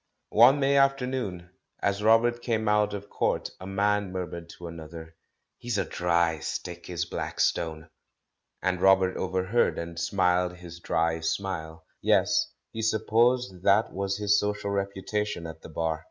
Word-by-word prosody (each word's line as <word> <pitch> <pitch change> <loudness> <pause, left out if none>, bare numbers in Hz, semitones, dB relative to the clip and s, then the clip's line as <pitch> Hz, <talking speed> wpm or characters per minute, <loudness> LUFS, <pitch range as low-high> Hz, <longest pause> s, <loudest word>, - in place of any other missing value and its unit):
One 125 +6 +6
May 140 0 +3
afternoon, 125 -10 0 0.3
as 100 +1 0
Robert 115 +2 +4
came 110 -2 -1
out 105 0 +2
of 100 0 -7
court, - - -1
a 95 - -8
man 100 0 0
murmured 85 -2 -5
to 90 - -9
another, 80 0 -9 0.4
"He's 120 -3 -2
a - - 0
dry 85 -2 +1
stick, 85 +3 -6
is 85 -3 -2
Blackstone!" 80 -1 -2 0.8
and 90 -1 0
Robert 95 -1 +4
overheard, 95 +5 0
and 85 0 -5
smiled 90 0 +1
his 85 -1 -11
dry 80 -1 0
smile. 80 -1 -3 0.2
Yes, - - +2 0.2
he 110 - -5
supposed 110 -1 +1
that 100 +3 +3
was 100 +1 -2
his 105 -1 +3
social 105 -1 -2
reputation 100 -1 -2
at 80 0 -8
the - - -11
Bar. 80 -1 -2
95 Hz, 145 wpm, -27 LUFS, 85-105 Hz, 0.8 s, One